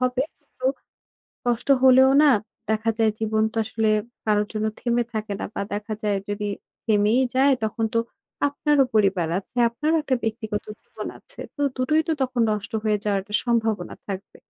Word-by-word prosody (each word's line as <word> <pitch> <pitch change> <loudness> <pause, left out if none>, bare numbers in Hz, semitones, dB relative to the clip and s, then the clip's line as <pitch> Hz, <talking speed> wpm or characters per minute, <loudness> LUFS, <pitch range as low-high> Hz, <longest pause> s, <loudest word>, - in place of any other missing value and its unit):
হবে, 255 +1 +1 0.4
তো 255 - -1 0.8
কষ্ট 240 +1 0 0.2
হলেও 260 +1 +7
না 295 - +7 0.4
দেখা 220 +1 +1
যায় 220 -1 +3
জীবন 220 0 +1
তো - - -4
আসলে 220 0 0 0.4
কারো 210 -1 +3
জন্য 215 0 -2
থেমে 240 0 +1
থাকে 215 -2 -3
না। - - -3
বা - - -3
দেখা 210 +1 -3
যায় 205 -2 +1
যদি 205 0 -2 0.4
থেমেই 215 +3 +3
যায় 270 +1 +5
তখন 220 +1 -1
তো 230 - +3 0.5
আপনারও 285 -1 +2
পরিবার 195 -5 +3
আছে, 220 - -20
আপনারও 300 +7 0
একটা 265 -3 0
ব্যক্তিগত 220 -2 -3 0.2
জীবন - - -8
আছে। - - -15 0.2
তো 290 - -5
দুটোই 305 +5 +2
তো 320 - +2
তখন 255 -2 0
নষ্ট 205 -1 -3
হয়ে 210 -1 +2
যাওয়ার 205 -2 +1
একটা 210 +1 -3
সম্ভাবনা 225 -6 0
থাকবে। 195 0 -6
220 Hz, 170 wpm, -24 LUFS, 210-255 Hz, 0.8 s, হলেও